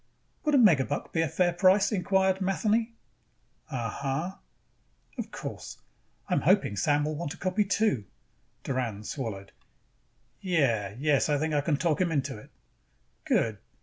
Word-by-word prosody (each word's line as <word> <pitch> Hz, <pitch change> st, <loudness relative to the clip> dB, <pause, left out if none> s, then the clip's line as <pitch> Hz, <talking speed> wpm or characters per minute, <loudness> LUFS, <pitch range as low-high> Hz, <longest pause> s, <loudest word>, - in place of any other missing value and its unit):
"Would 300 Hz, -1 st, +3 dB
a -, -, +6 dB
megabuck 155 Hz, -, +3 dB
be 165 Hz, -, +2 dB
a 165 Hz, -, +1 dB
fair 175 Hz, +2 st, +1 dB
price?" 190 Hz, +4 st, +4 dB
inquired 190 Hz, -1 st, +1 dB
Matheny. 215 Hz, +4 st, +1 dB, 0.8 s
"Uh... 125 Hz, -6 st, -2 dB
huh." 140 Hz, -, -2 dB, 0.9 s
"Of -, -, -4 dB
course, -, -, -7 dB, 0.5 s
I -, -, -1 dB
am -, -, +2 dB
hoping 105 Hz, -, +3 dB
Sam 145 Hz, +9 st, +2 dB
will 155 Hz, -, -2 dB
want 160 Hz, +1 st, -4 dB
a -, -, -18 dB
copy 185 Hz, +3 st, +1 dB
too." 200 Hz, -, +1 dB, 0.6 s
Doran 120 Hz, -6 st, -3 dB
swallowed. 105 Hz, -6 st, -5 dB, 0.9 s
"Yeah. 120 Hz, -, +1 dB
Yes, 145 Hz, +1 st, +2 dB
I 145 Hz, -, +3 dB
think 155 Hz, +2 st, -1 dB
I 145 Hz, -, +2 dB
can 145 Hz, 0 st, 0 dB
talk 165 Hz, +1 st, 0 dB
him 175 Hz, -2 st, +1 dB
into 140 Hz, -3 st, -1 dB
it." 105 Hz, -, -13 dB, 0.8 s
"Good." 110 Hz, -3 st, +1 dB
155 Hz, 150 wpm, -28 LUFS, 135-190 Hz, 0.9 s, a